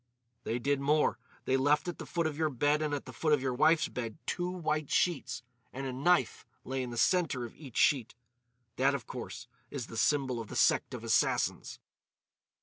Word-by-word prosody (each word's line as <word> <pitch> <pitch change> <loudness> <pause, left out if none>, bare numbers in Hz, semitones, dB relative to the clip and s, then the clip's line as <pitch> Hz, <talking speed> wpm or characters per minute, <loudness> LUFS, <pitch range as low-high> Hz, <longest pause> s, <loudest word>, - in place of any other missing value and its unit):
"They 115 - -1
did 140 +3 0
more. 150 +2 +2 0.3
They 130 - +2
left 145 +5 +2
at 175 - -4
the - - -7
foot 170 -1 -1
of 155 -2 -1
your 155 +1 +1
bed 145 +3 +1
and 155 -1 -1
at 145 -1 -3
the - - -9
foot 155 -2 +1
of 145 - +3
your 130 -1 0
wife's 155 +5 +4
bed 115 -1 -5
two 175 0 -1
white 155 -5 -2
sheets. 170 -7 0 0.3
And 135 +1 -5
a 130 - -3
knife 175 +8 +2 0.2
lay 135 +1 -2
in 125 - -4
the 120 - -6
centre 145 -4 +2
of 115 - -10
each 135 -7 -10
sheet. 130 -8 +3 0.6
That, 135 +2 +3
of 135 - -5
course, 120 -1 -7 0.2
is 135 -5 -4
the 115 - -9
symbol 130 0 +1
of 115 - -6
the - - -8
Sect - - +3
of - - -8
Assassins." - - +1
140 Hz, 205 wpm, -31 LUFS, 125-155 Hz, 0.6 s, wife's